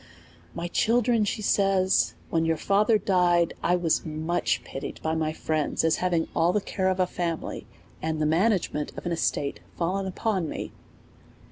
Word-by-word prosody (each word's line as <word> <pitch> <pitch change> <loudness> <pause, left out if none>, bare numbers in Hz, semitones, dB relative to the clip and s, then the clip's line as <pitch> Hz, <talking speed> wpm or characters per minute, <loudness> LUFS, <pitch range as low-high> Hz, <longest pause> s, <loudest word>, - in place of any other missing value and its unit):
My 170 +1 -3
children, 230 +2 +2
says 195 -3 +2
she, - - -15 0.2
when 165 -1 +2
your 165 0 +1
father 210 +6 +3
died, 175 -4 +2
I 175 - +2
was 175 -3 +1
much 160 +2 -1
pitied 135 +1 -7
by 160 - 0
my 160 -1 0
friends, 155 -1 -1
as 160 -1 +3
having 175 -3 0
all 165 +1 +3
the 210 - +2
care 190 -1 -1
of 185 0 -1
a 185 - +4
family, 170 -2 -4 0.3
and 160 0 -2
the 155 - +1
management 165 -2 +1
of - - -7
an 175 - -1
estate 145 -4 -1 0.2
fallen 190 +3 -1
upon 190 -3 -1
me. - - -5
175 Hz, 165 wpm, -26 LUFS, 160-195 Hz, 0.3 s, a